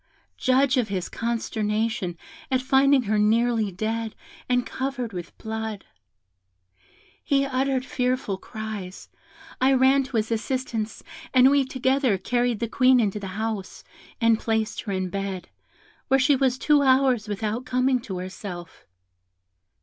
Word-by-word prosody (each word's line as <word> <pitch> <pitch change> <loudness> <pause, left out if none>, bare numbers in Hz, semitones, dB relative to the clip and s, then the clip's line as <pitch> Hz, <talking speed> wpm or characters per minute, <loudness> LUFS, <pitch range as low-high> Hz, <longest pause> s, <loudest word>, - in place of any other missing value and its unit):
Judge 260 +1 +3
of 245 -4 +2
his 190 -3 -3
consternation 220 -4 -2 0.3
at 260 -2 +2
finding 270 0 +4
her 210 -1 +1
nearly 225 0 +2
dead, 220 +4 -3 0.3
and 250 -1 +2
covered 260 -4 -4
with 175 -2 -7
blood! 220 -2 -5 1.4
He 275 -1 +2
uttered 265 -1 0
fearful 250 -7 -1
cries. 215 -4 -7 0.5
I 265 +1 +5
ran 265 +1 +5
to 260 -3 -3
his 220 +1 -1
assistance, 225 -2 -2 0.3
and 255 +1 +7
we 280 -1 +3
together 260 -3 +1
carried 240 +2 0
the 235 - 0
Queen 255 +2 +4
into 210 -2 0
the 200 - -6
house, 215 -3 -4 0.4
and 230 -1 +3
placed 220 -1 -1
her 205 - -5
in 185 -1 -2
bed, 195 -2 -4 0.6
where 270 - +4
she 280 +2 +4
was 260 -1 +1
two 295 +1 +3
hours 260 -4 +3
without 215 +3 -2
coming 255 0 +2
to 205 -6 -6
herself. 180 -1 -8
230 Hz, 135 wpm, -25 LUFS, 210-260 Hz, 1.4 s, and